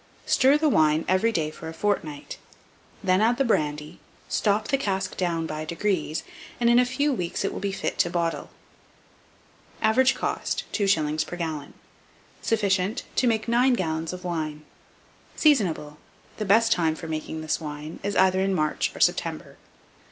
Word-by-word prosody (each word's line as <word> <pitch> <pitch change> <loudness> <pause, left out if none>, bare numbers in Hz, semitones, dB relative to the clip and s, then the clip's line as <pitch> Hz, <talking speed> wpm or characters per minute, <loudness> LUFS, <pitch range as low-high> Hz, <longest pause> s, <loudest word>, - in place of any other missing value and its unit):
Stir 270 +3 +4
the 310 +1 +1
wine 155 - +3
every 185 +5 +2
day 155 -7 -1
for 160 - -9
a 160 - -9
fortnight; 160 -7 -2 0.6
then 185 0 +3
add 235 +2 +3
the 275 - +2
brandy, 150 -8 -1 0.3
stop 210 0 0
the 275 - +3
cask 190 -5 -2
down 170 -3 -1
by 155 -1 -4
degrees, 170 -1 -1 0.4
and 235 0 +4
in 240 - +6
a 250 - +3
few 285 +3 +1
weeks 180 -3 -2
it - - -1
will - - -5
be 200 0 -2
fit 195 - -3
to 175 - +3
bottle. 170 -1 -2 1.3
Average 250 +4 +3
cost, - - -2
2s. 155 -7 +1
per - - -6
gallon. 160 -4 -5 0.7
Sufficient 200 -2 0
to 255 - +2
make 220 -1 +1
9 245 +3 +4
gallons 160 -5 -2
of 180 0 -8
wine. 155 -3 -4 0.7
Seasonable. 175 - +2 0.4
The 215 - -3
best 225 +3 +4
time 165 -5 +2
for 165 - -8
making 160 0 -4
this 155 +1 -2
wine 150 +1 -7
is 200 0 -2
either 190 0 +4
in 195 0 +1
March 155 -2 0
or - - -8
September. - - 0
185 Hz, 165 wpm, -25 LUFS, 160-220 Hz, 1.3 s, in